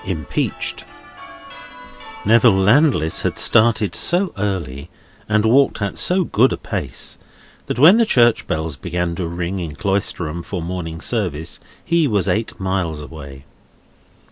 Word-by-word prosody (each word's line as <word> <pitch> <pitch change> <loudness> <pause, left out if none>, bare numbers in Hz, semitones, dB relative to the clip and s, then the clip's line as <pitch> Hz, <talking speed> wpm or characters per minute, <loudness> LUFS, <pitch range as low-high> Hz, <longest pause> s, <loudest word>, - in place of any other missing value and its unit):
IMPEACHED 80 -6 -3 1.4
Neville 115 -2 +5
Landless 100 - +2
had - - -2
started 110 -2 +3
so 180 +2 +1
early 85 -8 -4 0.4
and 110 0 +2
walked 135 +5 +3
at 100 -2 -3
so 185 +1 +2
good 130 -4 +2
a - - -2
pace, - - -4 0.5
that - - -3
when 170 - +7
the 230 - +4
church 120 - +3
bells 80 -2 -3
began 90 +3 -3
to 85 0 -4
ring 85 +3 -4
in 80 -4 -6
Cloisterham 85 -4 -2
for 90 +2 -5
morning 85 -1 -5
service, 90 -10 -3 0.3
he 170 -2 +2
was 100 -7 0
eight 110 +1 -2
miles 95 -5 -2
away. 70 -3 -10
95 Hz, 135 wpm, -19 LUFS, 80-115 Hz, 1.4 s, when